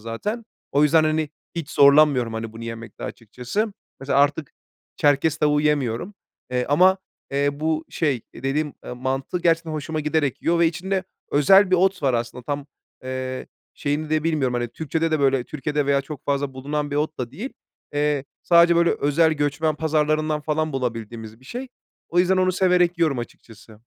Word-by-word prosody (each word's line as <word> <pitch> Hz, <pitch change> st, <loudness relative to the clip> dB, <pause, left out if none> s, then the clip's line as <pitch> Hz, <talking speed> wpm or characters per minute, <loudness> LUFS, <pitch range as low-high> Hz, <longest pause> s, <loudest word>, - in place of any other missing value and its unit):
zaten. 205 Hz, -, -4 dB, 0.3 s
O 145 Hz, -, +3 dB
yüzden, 155 Hz, +2 st, +5 dB
hani, 155 Hz, -1 st, 0 dB, 0.2 s
hiç 165 Hz, -4 st, -5 dB
zorlanmıyorum, 140 Hz, -4 st, +5 dB
hani, 110 Hz, 0 st, -5 dB
bunu 115 Hz, +1 st, -8 dB
yemekte 115 Hz, -2 st, -7 dB
açıkçası. 125 Hz, -, -4 dB, 0.3 s
Mesela 135 Hz, +1 st, +1 dB
artık 145 Hz, +1 st, +1 dB, 0.4 s
Çerkes 145 Hz, +2 st, +2 dB
tavuğu 150 Hz, -1 st, +2 dB
yemiyorum. 150 Hz, -, 0 dB, 0.4 s
Eee, 125 Hz, 0 st, 0 dB
ama, 185 Hz, +6 st, +5 dB, 0.3 s
eee, 140 Hz, +1 st, +1 dB
bu 155 Hz, +2 st, -1 dB
şey, 145 Hz, -8 st, 0 dB
eee, -, -, -12 dB
dediğim, 145 Hz, +2 st, -1 dB
ııı, 125 Hz, -, -6 dB
mantı 135 Hz, +6 st, -2 dB
gerçekten 165 Hz, -1 st, +2 dB
hoşuma 155 Hz, +1 st, -3 dB
giderek 150 Hz, -3 st, -1 dB
yiyor 170 Hz, 0 st, +2 dB
ve 170 Hz, -, +5 dB
içinde 185 Hz, +3 st, -2 dB, 0.3 s
özel 190 Hz, +7 st, +5 dB
bir 185 Hz, -, +5 dB
ot 190 Hz, -1 st, +2 dB
var 135 Hz, -3 st, +2 dB
aslında 120 Hz, +1 st, -3 dB
tam, 145 Hz, +1 st, -3 dB, 0.4 s
eee, 130 Hz, 0 st, -4 dB, 0.3 s
şeyini 150 Hz, +2 st, -2 dB
de 155 Hz, 0 st, +1 dB
bilmiyorum, 145 Hz, -7 st, +1 dB
hani, 120 Hz, 0 st, -1 dB
Türkçe'de 160 Hz, +5 st, -2 dB
de 155 Hz, -2 st, +1 dB
böyle 135 Hz, -2 st, +2 dB
Türkiye'de 150 Hz, +1 st, -2 dB
veya 140 Hz, -1 st, +3 dB
çok 140 Hz, 0 st, -9 dB
fazla 140 Hz, -1 st, -1 dB
bulunan 145 Hz, +2 st, -3 dB
bir 145 Hz, -, -2 dB
ot 155 Hz, +1 st, -1 dB
da 120 Hz, -2 st, -3 dB
değil. 210 Hz, -, -6 dB, 0.4 s
Eee, 145 Hz, -1 st, 0 dB, 0.2 s
sadece, 170 Hz, 0 st, +5 dB
böyle, 170 Hz, 0 st, +4 dB
özel 160 Hz, +3 st, +2 dB
göçmen 150 Hz, +1 st, 0 dB
pazarlarından 155 Hz, 0 st, 0 dB
falan 155 Hz, +1 st, -1 dB
bulabildiğimiz 115 Hz, -3 st, -5 dB
bir -, -, -20 dB
şey. 250 Hz, -, -6 dB, 0.4 s
O 175 Hz, -, 0 dB
yüzden 185 Hz, +1 st, +4 dB
onu 185 Hz, 0 st, +2 dB
severek 180 Hz, -2 st, +2 dB
yiyorum 155 Hz, -6 st, +2 dB
açıkçası. 115 Hz, -2 st, -10 dB
150 Hz, 175 wpm, -23 LUFS, 130-160 Hz, 0.4 s, yüzden